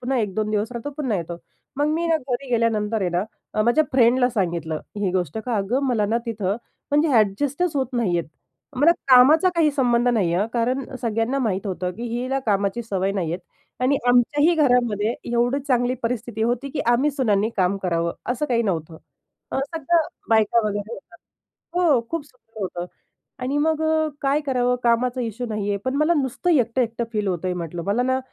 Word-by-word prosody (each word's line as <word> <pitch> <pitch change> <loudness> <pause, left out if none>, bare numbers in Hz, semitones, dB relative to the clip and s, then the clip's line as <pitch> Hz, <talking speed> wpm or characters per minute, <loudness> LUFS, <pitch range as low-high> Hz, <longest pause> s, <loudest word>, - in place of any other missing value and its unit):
पुन्हा 255 +1 -1
1-2 215 0 -1
दिवस 215 +2 -1
राहतो, 240 +4 -5
पुन्हा 260 -9 -1
येतो. 170 0 -5 0.4
मग 290 +1 +1
मी 335 +1 -1
ना 330 - +3
घरी 265 -2 -4
गेल्यानंतर 225 -2 +1
आहे 180 - 0
ना 175 +2 0 0.3
अ, 215 - +2
माझ्या 240 +8 +3
फ्रेंडला 250 0 +4
सांगितलं 170 -7 -2 0.2
ही 205 -2 0
गोष्ट, 180 0 -1
का 230 0 -2
अगं 220 +8 0
मला 225 -5 +1
ना 225 +3 +1
तिथं 210 -3 -1 0.3
म्हणजे 295 +3 +3
अ‍ॅडजस्टच 280 - +1
होत 265 -1 +1
नाहीये. 185 -8 +1 0.5
मला 295 +6 +5 0.2
कामाचा 275 +8 +7
काही 320 -3 +3
संबंध 245 -3 +2
नाही 205 -8 +2
आहे 190 - +2
हं, 220 - -3
कारण 250 +3 0 0.2
सगळ्यांना 230 +3 0
माहीत 210 -6 -1
होतं, 185 -1 -2
की 230 - -7
हिला 250 +3 -2
कामाची 200 +2 0
सवय 195 -3 -1
नाही 175 -5 -2
आहे 175 - -4 0.4
आणि 280 +2 +3
आमच्याही 290 +7 +4
घरामध्ये 240 -7 +2 0.2
एवढी 240 +3 +2
चांगली 245 -1 +2
परिस्थिती 230 -1 -2
होती, 240 +4 0
की 310 - -3
आम्ही 265 +5 +2
सुनांनी 220 -7 +1
काम 185 +1 +2
करावं 170 -2 0 0.2
असं 260 +5 -2
काही 235 -4 +1
नव्हतं. 165 -6 -3 0.6
अ, - - -1
सगळ्या 330 +3 +1 0.3
बायका 220 +1 +4
वगैरे 205 +2 -4
होत्या. 230 +3 -14 0.7
हो, 295 -8 +4
खूप 330 -3 -3
सुंदर 225 -5 -16
होतं. 175 -2 -4 0.6
आणि 270 +3 -1
मग 315 +1 +1
अ, 315 0 +2
काय 280 +1 +2
करावं. 250 -2 +1
कामाचा 245 +2 +2
इश्यू 235 +1 -4
नाही 210 -2 -3
आहे. 200 - 0
पण 260 +1 -1
मला 305 +4 +3
नुसतं 265 +7 -2
एकटं-एकटं 240 -5 +1
फील 210 -2 -1
होतंय 180 0 -1
म्हटलं. 170 -1 -5
मला 205 +5 +1
ना 260 +1 +1
235 Hz, 185 wpm, -23 LUFS, 205-265 Hz, 0.7 s, कामाचा